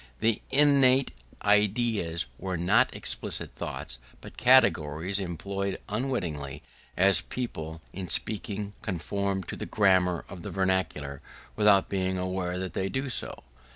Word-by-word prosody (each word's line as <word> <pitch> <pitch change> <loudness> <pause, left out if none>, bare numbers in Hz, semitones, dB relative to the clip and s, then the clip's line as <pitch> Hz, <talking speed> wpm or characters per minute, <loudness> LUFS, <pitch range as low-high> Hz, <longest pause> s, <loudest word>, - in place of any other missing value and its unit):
The 110 -1 +1
innate 135 -2 +4 0.3
ideas 105 -4 +2
were 95 -1 -3
not 105 +9 +3
explicit - - -1
thoughts 65 - -4 0.2
but - - -12
categories 95 - +3
employed 100 +2 -3
unwittingly, 85 - -3 0.3
as 95 -2 +5
people 80 -10 -6
in 95 -1 -5
speaking 105 +3 -1
conform 95 +2 -2
to - - -6
the - - -5
grammar 95 -4 +2
of 90 - -9
the - - -6
vernacular 95 -7 -1 0.3
without 105 -2 +5
being 95 -1 -1
aware 90 -1 -2
that 95 0 -4
they 95 0 -1
do 130 +3 -2
so. - - -2
95 Hz, 125 wpm, -28 LUFS, 90-105 Hz, 0.3 s, as